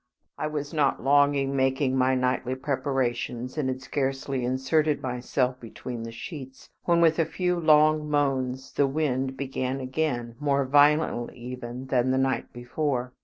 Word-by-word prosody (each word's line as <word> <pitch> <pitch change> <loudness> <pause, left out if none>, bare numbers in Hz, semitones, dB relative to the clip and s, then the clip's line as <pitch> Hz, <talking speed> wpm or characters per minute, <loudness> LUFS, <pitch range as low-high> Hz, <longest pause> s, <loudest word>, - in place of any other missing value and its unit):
I 155 - -2
was 150 -1 -4
not 145 -6 +1
long 145 +1 +4
in 135 0 -1
making 130 0 +1
my 130 0 +3
nightly 125 0 0
preparations, 130 -2 -2
and 145 -4 -1
had 130 0 -4
scarcely 135 -1 -2
inserted 140 +5 +1
myself 125 0 -1
between 120 0 -7
the 115 0 -6
sheets 135 +2 -9
when, 170 -1 +3
with 165 0 +4
a - - +5
few 180 +2 -1
long 155 -1 +4
moans, 135 -3 0
the 140 - +2
wind 135 -2 -1
began 130 -1 -3
again, 130 -3 -2
more 140 -2 +1
violently 145 -3 +3
even 125 +1 -7
than 130 -1 +1
the 130 - +2
night 130 -2 0
before. 125 +1 -2
135 Hz, 155 wpm, -26 LUFS, 125-145 Hz, -, a